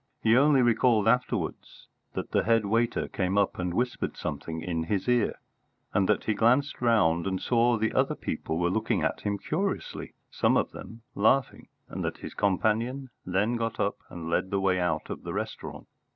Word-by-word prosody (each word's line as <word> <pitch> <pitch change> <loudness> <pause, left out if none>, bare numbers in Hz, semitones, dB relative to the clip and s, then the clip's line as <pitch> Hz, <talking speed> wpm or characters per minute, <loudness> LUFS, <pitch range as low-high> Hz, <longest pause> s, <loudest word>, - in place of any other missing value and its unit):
He 115 +1 +5
only 140 0 +5
recalled 115 -2 +3
afterwards 125 +2 -1 0.3
that - - -5
the - - +2
head 115 -2 +3
waiter 115 +3 +1
came 95 +1 -1
up 100 -2 +1
and 90 -1 -1
whispered 120 +7 -2
something 80 0 -4
in 80 -1 -2
his 95 +1 -1
ear, 120 -3 +2 0.6
and 95 0 +2
that 105 - +2
he 110 - 0
glanced 125 +7 +2
round 95 -8 +3
and 95 -1 -1
saw 120 +1 +2
the 110 0 0
other - - +1
people 80 - -3
were 85 +1 +1
looking 110 +3 0
at - - -1
him 100 0 -1
curiously, 190 - -3 0.2
some - - +2
of - - 0
them 115 +2 -10
laughing, 125 +6 +1 0.2
and - - -5
that - - -3
his - - -8
companion 115 +7 0 0.2
then 105 +6 +1
got 115 -1 -3
up 100 - 0
and 85 -2 -7
led 85 +3 0
the 100 0 0
way 95 -1 +2
out 80 -3 -1
of - - -5
the - - -6
restaurant. - - -5
110 Hz, 185 wpm, -28 LUFS, 95-120 Hz, 0.6 s, He